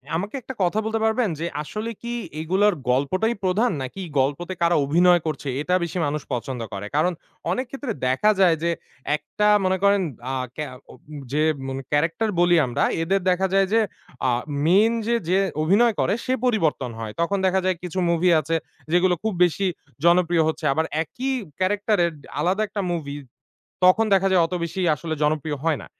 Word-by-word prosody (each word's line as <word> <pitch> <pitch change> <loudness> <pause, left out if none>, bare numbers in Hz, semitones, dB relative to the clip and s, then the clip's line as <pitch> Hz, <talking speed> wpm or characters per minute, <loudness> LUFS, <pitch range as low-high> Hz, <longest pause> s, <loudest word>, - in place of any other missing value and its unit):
আমাকে 200 +9 -3
১ 240 - -21
টা 260 - -2
কথা 180 +4 +1
বলতে 220 0 -1
পারবেন? 220 0 +1
যে 165 - -2 0.2
আসলে 215 +8 -5
কি 235 0 -4 0.3
এগুলার 190 +6 +2 0.2
গল্পটাই 185 - +1
প্রধান, 210 +6 +2
নাকি 130 +9 -6 0.2
গল্পতে 145 +7 -1
কারা 170 0 +3
অভিনয় 175 +4 +4
করছে, 150 -2 -4
এটা 180 +4 +1
বেশি 170 +1 -4
মানুষ 145 +1 -2
পছন্দ 125 +1 -3
করে? 100 +1 -5
কারণ 175 +4 +2 0.4
অনেক 255 +1 -1
ক্ষেত্রে 275 -2 -5 0.2
দেখা 135 +12 +3
যায় 180 -4 +5
যে 170 - +2 0.5
একটা 210 +6 -1 0.2
মনে 185 0 +2
করেন 200 0 +4 0.3
আ - - -2 0.2
কে 150 - -3
আ - - -10 0.2
উম - - -16 0.3
যে 150 +1 +2 0.2
মন 135 0 -4
ক্যারাক্টার 165 +9 +1
বলি 175 0 +5
আমরা, 120 - -1 0.2
এদের 195 +4 +1
দেখা 190 +2 +1
যায় 195 0 +4
যে, 225 - +5 0.5
আ 125 - +3 0.3
মেইন 205 +7 +4
যে, 235 - +2
যে 185 +2 +3 0.2
অভিনয় 210 +8 +4
করে, - - +2
সে 255 - +1
পরিবর্তন 160 - +1
হয়। 110 -2 -5
তখন 200 +4 +1
দেখা 190 0 +3
যায় 185 - +2
কিছু 180 +1 -3
মুভি 170 +2 +2
আছে, 160 +2 -2 0.4
যেগুলো 180 +1 +3
খুব 220 -1 0
বেশি 185 +3 +1 0.4
জনপ্রিয় 170 -1 +4
হচ্ছে। 160 0 -3
আবার 160 +3 0 0.2
একই 260 - -4 0.3
ক্যারাক্টার 205 +3 +1
এর 170 - -1
ডে - - -16
আলাদা 185 +7 +1
একটা 205 -1 -4
মুভি, 145 -4 -4 0.7
তখন 185 +5 +6
দেখা 195 0 +3
যায় 185 -2 +4
অত 180 - -5
বেশি 170 +3 -4
আসলে 160 +2 -4
জনপ্রিয় 150 0 0
হয় 160 -4 +1
না। - - -10
180 Hz, 185 wpm, -23 LUFS, 155-205 Hz, 0.7 s, তখন